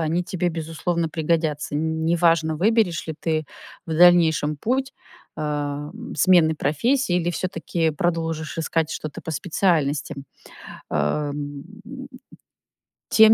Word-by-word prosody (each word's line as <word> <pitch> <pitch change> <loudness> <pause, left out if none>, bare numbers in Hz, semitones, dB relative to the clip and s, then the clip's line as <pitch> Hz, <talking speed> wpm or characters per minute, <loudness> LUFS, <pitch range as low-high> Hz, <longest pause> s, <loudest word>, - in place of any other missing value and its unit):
они 165 +2 0
тебе, 180 -1 -1
безусловно 165 +1 -2
пригодятся. 155 -2 -1
Н 160 +1 -1
неважно, 165 -2 +3
выберешь 205 -3 +2
ли 160 - -4
ты 155 -1 0 0.4
в 160 - -4
дальнейшем 160 -3 +5
путь, 260 - -1 0.4
ам, 150 - -4
смены 175 -4 +5
профессии 180 - +1
или 175 -1 0
всё-таки 165 -2 -1
продолжишь 165 0 -2
искать 160 -1 0
что-то 155 -1 -6
по - - -6
специальности. 155 -3 0 0.8
Ам. 145 - -2 1.5
Тем 220 0 +7
160 Hz, 110 wpm, -23 LUFS, 150-175 Hz, 1.5 s, Тем